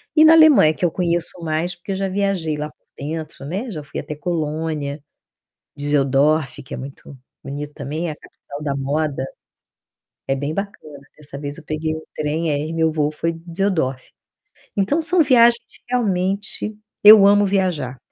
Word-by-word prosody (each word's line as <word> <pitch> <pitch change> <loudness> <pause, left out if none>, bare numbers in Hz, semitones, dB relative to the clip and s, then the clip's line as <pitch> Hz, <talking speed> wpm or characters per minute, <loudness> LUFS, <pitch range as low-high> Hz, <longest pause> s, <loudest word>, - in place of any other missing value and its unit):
E, 310 - +7
na 320 +1 +8
Alemanha, 305 - +7
que 175 - -2
eu 165 - +1
conheço 175 -1 -1
mais, 165 +2 -2
porque 175 +3 -8
eu - - -1
já 195 0 -1
viajei 190 -5 -1
lá 150 +1 -4
por 150 - -28
dentro, 155 -1 -6
né, 200 - -4
já 155 -4 -6
fui 140 - -7
até 150 0 -6
Colônia, 155 -2 -3 0.8
Düsseldorf, 145 0 +1
que - - -10
é - - -4
muito 135 +1 -10 0.3
bonito 145 +1 -6
também, 155 +4 -4
a 150 - -5
capital 145 0 -11
da 140 -2 -2
moda. 140 0 -2 1.0
É 135 - +1
bem 145 +2 -3
bacana. 195 -8 -6 0.2
Dessa 145 -2 -10
vez 145 0 -5
eu 165 - -12
peguei 155 +1 -2
o 160 - -9
trem, 155 +2 -1
aí 150 +3 -2
meu 160 -1 +1
voo 150 -1 0
foi 165 +2 -2
Düsseldorf. 165 -6 -2 0.7
Então, 280 +12 +1
são 360 +2 +6
viagens 235 -3 +5
que, - - -21
realmente 200 -2 0 0.3
eu 210 -1 +10
amo 205 0 +5
viajar. 175 -10 -1
160 Hz, 170 wpm, -20 LUFS, 145-195 Hz, 1.0 s, eu